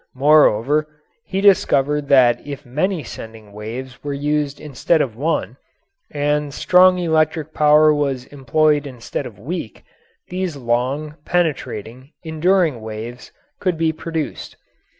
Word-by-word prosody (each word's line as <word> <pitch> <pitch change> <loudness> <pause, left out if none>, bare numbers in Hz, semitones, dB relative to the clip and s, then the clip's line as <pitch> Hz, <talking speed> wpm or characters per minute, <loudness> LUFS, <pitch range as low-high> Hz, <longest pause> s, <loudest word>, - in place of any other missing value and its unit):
Moreover, 145 0 +4 0.4
he 190 0 -2
discovered 150 -7 +3
that 125 -4 +5
if 140 -2 -8
many 155 +7 -1
sending 110 -3 -10
wires 120 +5 -8
were 145 -1 -3
used 145 0 -1
instead 155 +3 0
of 125 -7 -1
one, 155 +7 -2 0.5
and 145 0 -1
strong 180 0 +5
electric 155 -2 0
power 150 0 +5
was 140 -4 -1
employed 145 +2 +1
instead 125 +1 -6
of 110 -5 -13
weak, 135 - -6 0.5
these 180 -3 -3
long, 135 +5 -2
penetrating, 135 - -2
enduring 160 - +1
waves 110 +3 -8 0.3
could 180 -4 -1
be 160 0 +1
produced. 160 -1 -5
145 Hz, 120 wpm, -20 LUFS, 125-160 Hz, 0.5 s, that